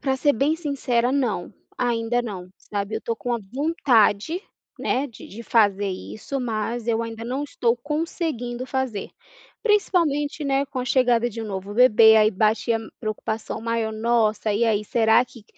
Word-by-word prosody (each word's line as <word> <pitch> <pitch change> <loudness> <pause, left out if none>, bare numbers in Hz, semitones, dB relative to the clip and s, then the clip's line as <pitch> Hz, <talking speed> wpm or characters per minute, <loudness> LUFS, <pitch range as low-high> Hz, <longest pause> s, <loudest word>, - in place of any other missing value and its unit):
pra 265 -1 0
ser 290 +2 +3
bem 285 +6 +1
sincera, 265 -6 0
não. 240 -10 -1 0.3
Ainda 240 0 0
não, 190 -6 -6
sabe. 205 +1 -4
Eu - - -4
tô 230 - -2
com 245 - -5
uma 235 -2 0
vontade, 275 - +2 0.4
né, 270 +3 0
de 235 - -12
de 225 +4 -9
fazer 205 -4 +3
isso, 185 - -5
mas 230 0 -3
eu 225 -1 +1
ainda 230 0 -6
não 260 +4 -2
estou 240 -4 0
conseguindo 285 -3 -3
fazer. 260 -6 -3 0.5
Principalmente, 325 -9 +1
né, 275 0 +1
com 265 -1 -6
a 250 - -3
chegada 245 -2 +2
de 230 +1 -7
um 220 - -5
novo 195 0 -5
bebê, 225 -2 +7
aí 215 -1 +6
bate 220 +3 +1
a 225 - +1 0.2
preocupação 215 0 -4
maior: 230 -1 -1
"Nossa, 220 -1 +1
e 215 +3 +2
aí? 210 -2 +1
Será 225 +2 +3
que 235 -4 -16
235 Hz, 170 wpm, -23 LUFS, 220-265 Hz, 0.5 s, bebê